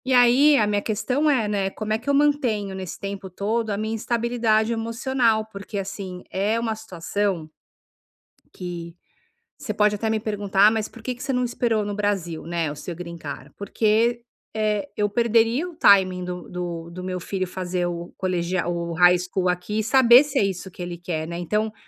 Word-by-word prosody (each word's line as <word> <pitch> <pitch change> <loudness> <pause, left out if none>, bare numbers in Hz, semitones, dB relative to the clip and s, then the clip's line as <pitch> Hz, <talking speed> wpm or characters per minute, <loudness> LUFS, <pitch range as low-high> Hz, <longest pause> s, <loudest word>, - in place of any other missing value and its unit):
E 260 0 +2
aí, 255 +4 +6
a 215 - +4
minha 205 0 0
questão 250 +8 0
é, 250 -7 +2
né, 200 -2 0
como 215 +2 -3
é 220 - 0
que 250 - -6
eu - - +3
mantenho, 260 -9 +1
nesse 190 -2 -6
tempo 195 -1 -6
todo, 220 +5 -1
a 200 - -1
minha 220 +1 -2
instabilidade 230 -1 +1
emocional, 230 0 0
porque 200 -1 -8
assim, 190 -2 -5
é 205 +4 0
uma 230 -1 -1
situação 195 -3 -2 1.1
que 170 -2 -7 0.6
você 210 - -4
pode 210 0 +3
até 220 +2 -1
me 220 -1 0
perguntar: 205 -2 +2
"Ah, - - +4
mas 220 -1 -1
por 230 - -14
que 250 +1 -4
você 270 - -2
não 250 -1 +1
esperou 235 -3 0
no 205 0 -3
Brasil, 195 -6 -2
né, 170 -2 -1
o 145 - -7
seu 170 +4 -6
green 170 0 -7
card?", - - -8
porque, 225 +4 +1 0.3
eh, 210 -2 0
eu 205 0 +1
perderia 235 - +2
o 345 - -12
timing 185 - +5
do 180 0 -6
do 170 -2 -5
do 180 +1 -8
meu 185 -1 -3
filho 185 +1 -3
fazer 180 -1 -2
o 175 0 -5
colegial, 180 -1 -1
o 170 0 -3
High 180 +1 +6
School 180 +1 -1
aqui, 180 +4 -1
e - - -2
saber 255 +2 +7
se 290 - -1
é - - +3
isso 190 -1 -3
que 180 - -9
ele 175 -1 -5
quer, 165 -2 -3
né, 170 0 -5
então, 210 +5 -1
205 Hz, 200 wpm, -24 LUFS, 180-225 Hz, 1.1 s, saber